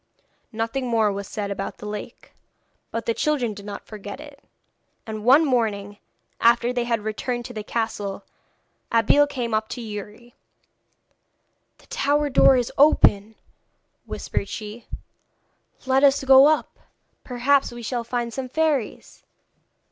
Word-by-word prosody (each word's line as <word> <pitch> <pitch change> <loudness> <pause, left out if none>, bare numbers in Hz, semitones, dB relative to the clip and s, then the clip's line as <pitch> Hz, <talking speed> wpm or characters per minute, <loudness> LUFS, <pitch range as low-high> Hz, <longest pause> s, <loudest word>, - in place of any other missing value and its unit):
Nothing 230 +3 -3
more 225 -3 +2
was 200 0 -5
said 205 -2 -4
about 195 0 -5
the - - -10
lake, 210 0 -8 0.6
but 230 - -4
the 230 - +1
children 255 -5 0
did 200 0 -11
not 200 -1 -7
forget 205 +2 -9
it, 290 -2 -13 0.6
and 215 -1 -6
one 275 +7 +6
morning, 210 -6 -1 0.4
after 235 +1 +3
they 245 -1 -1
had 230 -2 0
returned 240 +3 -3
to 245 - -8
the 215 -2 -5
castle, 205 -3 -3 0.7
Abeille 230 +6 +4
came 245 -5 -4
up 215 0 0
to - - -6
Youri. 215 +1 -8 1.4
'The - - -22
tower 290 +1 0
door 265 0 +6
is 245 -2 -1
open,' 220 -7 +4 0.7
whispered 200 - -4
she; 215 +2 -8 1.0
'let 265 +1 +2
us 280 -1 +4
go 270 +1 +8
up. 310 0 0 0.4
Perhaps 265 +2 +1
we 240 0 -9
shall 240 +1 -2
find 235 0 -3
some 260 0 -5
fairies.' 300 -5 -2
235 Hz, 140 wpm, -23 LUFS, 215-265 Hz, 1.4 s, go